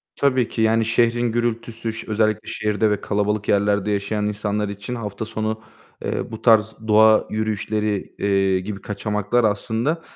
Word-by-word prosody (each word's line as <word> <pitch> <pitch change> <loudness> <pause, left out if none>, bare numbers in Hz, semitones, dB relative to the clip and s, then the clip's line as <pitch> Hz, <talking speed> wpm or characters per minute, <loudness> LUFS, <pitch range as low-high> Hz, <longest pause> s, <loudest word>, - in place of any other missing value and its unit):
Tabii 130 -4 +2
ki, 115 - -3
yani, 110 0 +3
şehrin 115 +1 +2
gürültüsü 115 -1 -2 0.2
özellikle 110 0 +1
şehirde 105 0 0
ve 105 - -1
kalabalık 105 0 -1
yerlerde 100 0 +2
yaşayan 105 +1 -1
insanlar 105 0 -2
için 100 +4 -6
hafta 105 -2 -5
sonu, 110 0 -3 0.4
eee, - - -3
bu 110 - -7
tarz 110 -2 +4
doğa 110 0 +5
yürüyüşleri, 105 -1 -2
eee, 95 -1 +2
gibi 100 +1 -6
kaçamaklar 105 +3 -1
aslında 115 +9 0
110 Hz, 140 wpm, -22 LUFS, 105-115 Hz, 0.4 s, doğa